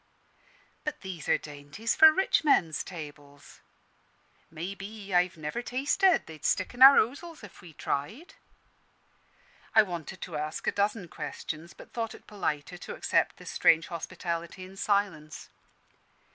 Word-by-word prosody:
"But 300 0 -4
these 180 -6 -7
are - - +5
dainties 150 +9 -4
for 315 0 +9
rich 380 +2 +2
men's 170 - +3
tables." 145 -4 -11 0.9
"May 170 +4 -5
be. 200 0 -8
I've 180 0 +2
never 155 +9 -4
tasted 285 +9 +2
they'd 155 -2 -12
stick 185 - +1
in 245 - -10
our 270 +1 +11
ozels 290 +6 -1
if 200 -3 -12
we 170 -2 -13
tried." 210 - -4 1.4
I 220 - +8
wanted 175 -2 -6
to 165 -5 -5
ask 155 +1 -4
a - - +2
dozen 205 -2 -1
questions, 155 +2 -7
but - - -14
thought 225 -2 -3
it - - -16
politer 180 -4 -3
to - - -7
accept - - +1
this - - -8
strange 160 0 +4
hospitality 170 +1 -5
in 190 +1 -13
silence. 195 -7 -1
185 Hz, 145 wpm, -29 LUFS, 155-220 Hz, 1.4 s, our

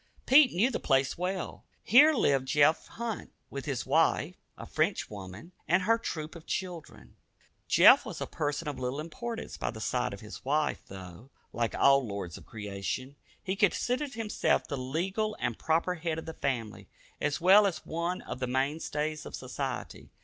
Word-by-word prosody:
Pete 270 0 +7
knew 225 +9 +2
the - - -2
place 135 -1 +2
well. 180 +1 -4 0.2
Here 280 - +7
lived 135 - +2
Jeff 150 +3 +3
Hunt 230 -2 -5 0.2
with 140 -1 -5
his 135 -4 -2
wife, - - +2 0.2
a - - -8
French - - -1
woman, 100 - -9 0.2
and 185 +3 +3
their 230 0 +4
troop 155 -7 -5
of 165 - -12
children. 160 - -6 0.5
Jeff - - +7
was - - -7
a - - -2
person 150 +1 -3
of 145 - -4
little 130 +3 -2
importance 230 +9 -6
by - - -2
the 110 - -7
side 125 +2 -1
of 100 - -7
his 105 - -10
wife, 150 +3 0
though, 95 +5 -10 0.2
like 115 -1 -1
all 140 0 +5
"lords 100 -7 -5
of - - -12
creation," 105 +6 -5 0.3
he 190 -1 -2
considered 245 +7 +1
himself 225 -2 0
the - - -3
legal 185 +11 -2
and 120 -2 -2
proper 165 +3 +1
head 165 -2 -3
of 160 - -6
the 160 - -6
family, 120 -8 -3 0.3
as 150 +1 0
well 195 +4 +7
as 165 -7 -4
one 170 +3 -3
of - - -6
the 125 - -2
mainstays 150 +3 -1
of - - -6
society. 130 0 -5
150 Hz, 175 wpm, -30 LUFS, 125-185 Hz, 0.5 s, Pete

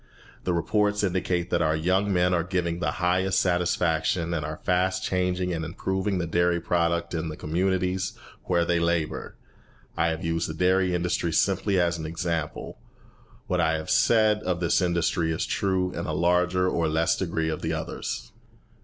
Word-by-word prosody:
The 90 - +1
reports 105 +4 +1
indicate 90 -2 -1
that 85 - +2
our 80 -1 +2
young 95 +5 +1
men 90 -1 +2
are 85 - +2
giving 85 -2 -2
the - - -1
highest 95 +1 +1
satisfaction, 90 -1 +1
and 80 -3 -1
are 75 +1 -5
fast 90 +1 +1
changing 90 -1 0
and 80 -1 -3
improving 95 +3 -2
the 90 - -1
dairy 85 +1 +1
product 85 0 0
in 80 -1 -2
the 75 - -7
communities 95 +3 -1 0.3
where 85 -2 +2
they 85 0 +1
labour. 85 -2 -1 0.6
I 85 - +2
have 80 0 -2
used 85 0 -1
the 80 - -5
dairy 90 +1 +2
industry 85 -1 -1
simply 95 +3 +2
as 85 -1 +1
an 80 - -4
example. 80 -1 -4 0.7
What - - 0
I 80 - +2
have 80 -1 -3
said 110 -2 +4
of 90 -3 -1
this 85 +2 +2
industry 85 -2 +1
is 80 - -1
true 95 -2 0
in - - -5
a 75 - -2
larger 90 +3 +2
or 85 -3 +1
less 80 +4 +2
degree 80 -3 -1
of 80 - -3
the - - -1
others. - - -5
90 Hz, 175 wpm, -26 LUFS, 85-95 Hz, 0.7 s, said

